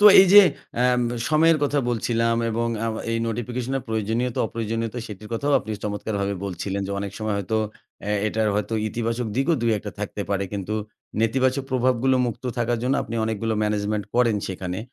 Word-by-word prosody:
তো - - +4 0.2
এই 195 - +6
যে, 205 - +11 0.4
অ্যাম 125 0 +3 0.3
সময়ের 160 +1 +4
কথা 145 0 +1
বলছিলাম 115 0 +1
এবং 115 +1 0
আ - - -5
আউ 115 - -1 0.2
এই 115 - 0
নোটিফিকেশন 120 +3 -3
এর - - -7
প্রয়োজনীয়তা, 110 +3 -1
অপ্রয়োজনীয়তা 115 +1 -3
সেটির 105 0 -9
কথাও 140 +5 0
আপনি 110 - -8
চমৎকারভাবে 100 -1 -2
বলছিলেন 95 +1 -3
যে, - - -5
অনেক 100 -1 -4
সময় 110 -1 -1
হয়তো 100 +3 -1 0.5
অ্যা 105 - -2
এটার 110 0 +1
হয়তো 105 +2 -1
ইতিবাচক 115 +2 -2
দিকও 135 +6 +3
২-১ 110 -3 +1
টা 105 - -4
থাকতে 105 0 -3
পারে। 100 -1 +1
কিন্তু 100 +1 -3 0.5
নেতিবাচক 130 +4 +2
প্রভাবগুলো 130 0 +2
মুক্ত 120 +1 -5
থাকার 120 0 +1
জন্য 130 +2 +2
আপনি 115 - -6
অনেকগুলো 110 0 -1
management 105 0 -1
করেন 120 -3 +3
সেখানে। 95 -1 -4
115 Hz, 175 wpm, -24 LUFS, 105-125 Hz, 0.5 s, যে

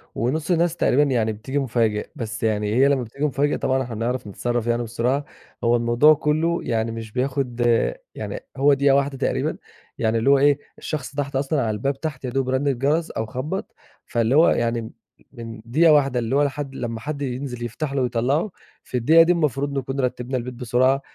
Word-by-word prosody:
ونص 150 +9 -1
الناس 170 -1 +2
تقريبًا 145 -3 +3
يعني 120 -6 +1
بتيجي 130 +7 -3
مفاجئ. 115 -5 0
بس 110 -2 -5
يعني 105 -1 0
هي 135 +3 +5
لما 140 -3 +2
بتيجي 140 +6 -4
مفاجئ، 145 0 +1
طبعًا 130 0 0
إحنا 120 -3 -6
بنعرف 120 +2 -2
نتصرف 120 +3 -2
يعني 120 0 +1
بسرعة. 120 +5 -1 0.4
هو 120 0 +4
الموضوع 120 +6 +5
كله 155 +3 0
يعني 115 0 -1
مش 115 -1 -7
بياخد 125 -1 -2
آآ، 120 - +2 0.2
يعني - - -5 0.2
هو 140 +2 +5
دقيقة 140 0 +4
واحدة 140 0 0
تقريبًا، - - -1 0.4
يعني 110 0 +1
اللي 115 +4 +2
هو 140 - +6
إيه، 145 +1 +4 0.2
الشخص 145 -2 -5
تحت 140 -1 -3
أصلًا 135 +1 0
على 115 - 0
الباب 135 +6 -2
تحت 140 -5 -4
يا - - -2
دوب 130 +1 -1
رن 130 +2 0
الجرس 140 +5 +1
أو 110 - -3
خبَّط، 155 - -5 0.3
فاللي 120 +2 +1
هو 160 +3 +6
يعني 115 0 0
م 110 - -8 0.4
من 115 -1 -9
دقيقة 155 +7 +4
واحدة 135 -4 +3
اللي 115 +2 -1
هو 145 - +4
لحد 140 -1 -3
لما 115 -3 -4
حد 145 +4 -5
ينزل 125 -2 -4
يفتح 135 +5 -4
له 140 - 0
ويطلَّعه، 130 - 0 0.3
في 125 - -3
الدقيقة 160 +8 +6
دي 170 - +3
المفروض 145 -4 0
نكون 135 +1 -3
رتبنا 125 0 -1
البيت 125 +1 -5
بسرعة، 125 +2 +1
130 Hz, 200 wpm, -23 LUFS, 120-145 Hz, 0.4 s, هو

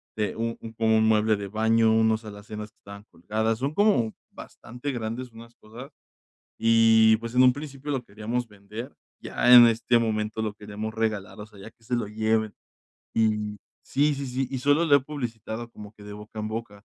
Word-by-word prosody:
de 105 -1 -2
u 115 0 -1
u - - -11
un 115 0 -9
como 110 0 +2
un 110 - +3
mueble 110 0 +3
de 100 -1 -6
baño, 110 +1 +3
unos 110 0 +2
alacenas 105 0 -9
que - - -50
estaban 100 0 -12
colgadas. 110 +5 -2
Son 140 +3 -2
como 200 - +2 0.2
bastante 125 +4 -8
grandes 120 +2 -5
unas 115 +1 -13
cosas, 120 +7 -12 0.7
y, 115 -1 +5
pues, 115 +1 -7
en 125 - +5
un 125 - +7
principio 145 0 -7
lo 130 -3 -2
queríamos 115 +4 -4
vender, 105 +5 -9 0.2
ya 125 - +1
en 120 -1 +11
este 115 +1 +2
momento 110 -1 -2
lo 105 -1 -2
queremos 105 +1 -7
regalar, 110 -3 -3
o 105 - -7
sea, 105 -2 -17
ya 110 +3 -11
que 115 - -32
se 120 +2 -2
lo 115 -4 -2
lleven. 110 0 0 0.6
Y 105 -2 0 0.3
Sí, 145 +2 +2
sí, 140 0 -5
sí, 130 +1 -2
y 130 - -3
solo 145 +5 +3
lo 140 -2 +6
he - - +1
publicitado 120 -4 -6
como 105 -1 -12
que 105 - -17
de 105 0 -8
boca 105 +1 -11
en 105 0 -3
boca. 110 -2 -7
110 Hz, 200 wpm, -26 LUFS, 105-120 Hz, 0.7 s, en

